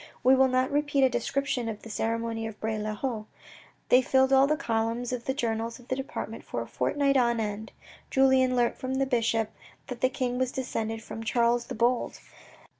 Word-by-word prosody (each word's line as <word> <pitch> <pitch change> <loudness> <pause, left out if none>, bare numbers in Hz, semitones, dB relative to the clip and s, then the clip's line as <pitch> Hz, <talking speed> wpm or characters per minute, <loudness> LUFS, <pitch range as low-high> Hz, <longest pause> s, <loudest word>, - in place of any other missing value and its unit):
We 260 - +6
will 265 0 +5
not 255 0 +1
repeat 290 -1 +2
a 260 - +5
description 245 0 -1
of 210 -2 -7
the 225 - -9
ceremony 225 0 -2
of 220 -1 -9
Bray 220 0 -2
le 215 0 -3
Haut. 220 -2 -3 0.6
They 250 - +7
filled 265 +1 +3
all 270 +1 +6
the 305 +1 +1
columns 230 -1 -1
of 240 -1 -4
the 265 - 0
journals 230 -2 -2
of 245 -1 -18
the 255 - +1
department 270 +1 -5
for - - -4
a - - -12
fortnight 280 -1 +1
on 235 -2 +2
end. 215 0 -4 0.4
Julien 265 -1 +4
learnt 240 -1 +1
from 260 0 -3
the 270 0 +1
bishop 230 -4 0 0.4
that 250 -2 -6
the 255 - +4
king 250 -1 -2
was 255 -1 0
descended 225 -4 -3
from 225 - -7
Charles 235 +1 +1
the - - -5
Bold. 240 +2 0
245 Hz, 200 wpm, -28 LUFS, 225-265 Hz, 0.6 s, They